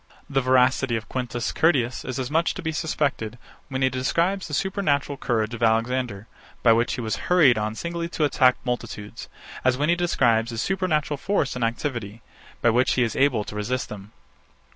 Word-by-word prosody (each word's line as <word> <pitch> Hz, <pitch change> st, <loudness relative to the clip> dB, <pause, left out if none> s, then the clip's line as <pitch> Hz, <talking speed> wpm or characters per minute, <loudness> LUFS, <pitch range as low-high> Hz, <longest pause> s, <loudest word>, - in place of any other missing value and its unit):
The 135 Hz, -1 st, +1 dB
veracity 130 Hz, -1 st, +3 dB
of 115 Hz, 0 st, -4 dB
Quintus 120 Hz, -2 st, -3 dB
Curtius 130 Hz, -7 st, +1 dB
is 130 Hz, -, -4 dB
as 130 Hz, 0 st, -3 dB
much 165 Hz, +2 st, +1 dB
to 185 Hz, -, -6 dB
be 160 Hz, -, -1 dB
suspected, 140 Hz, -7 st, -2 dB, 0.3 s
when 130 Hz, -1 st, -2 dB
he 130 Hz, -, +4 dB
describes 170 Hz, +9 st, 0 dB
the 150 Hz, -, -8 dB
supernatural 150 Hz, -8 st, 0 dB
courage 120 Hz, -4 st, -1 dB
of 120 Hz, -, -6 dB
Alexander, 115 Hz, -2 st, 0 dB, 0.4 s
by 115 Hz, -, +7 dB
which 115 Hz, +1 st, +1 dB
he -, -, -4 dB
was 110 Hz, -2 st, -2 dB
hurried 160 Hz, -9 st, +6 dB
on 110 Hz, 0 st, -2 dB
singly 170 Hz, +4 st, -4 dB
to 165 Hz, -, -2 dB
attack 130 Hz, -3 st, +4 dB
multitudes, 115 Hz, -4 st, -5 dB, 0.3 s
as 130 Hz, 0 st, +2 dB
when 150 Hz, +3 st, 0 dB
he 170 Hz, -, +4 dB
describes 120 Hz, -10 st, +2 dB
his 115 Hz, -1 st, -5 dB
supernatural 155 Hz, -5 st, 0 dB
force 195 Hz, -7 st, 0 dB
and 125 Hz, -, -2 dB
activity, 115 Hz, -3 st, -3 dB, 0.4 s
by 120 Hz, -, +5 dB
which 125 Hz, +3 st, +2 dB
he 125 Hz, -, +2 dB
was 115 Hz, -2 st, -2 dB
able 130 Hz, -6 st, +2 dB
to 105 Hz, -, -9 dB
resist 120 Hz, +5 st, -2 dB
them. 105 Hz, 0 st, -9 dB
130 Hz, 185 wpm, -24 LUFS, 115-150 Hz, 0.4 s, by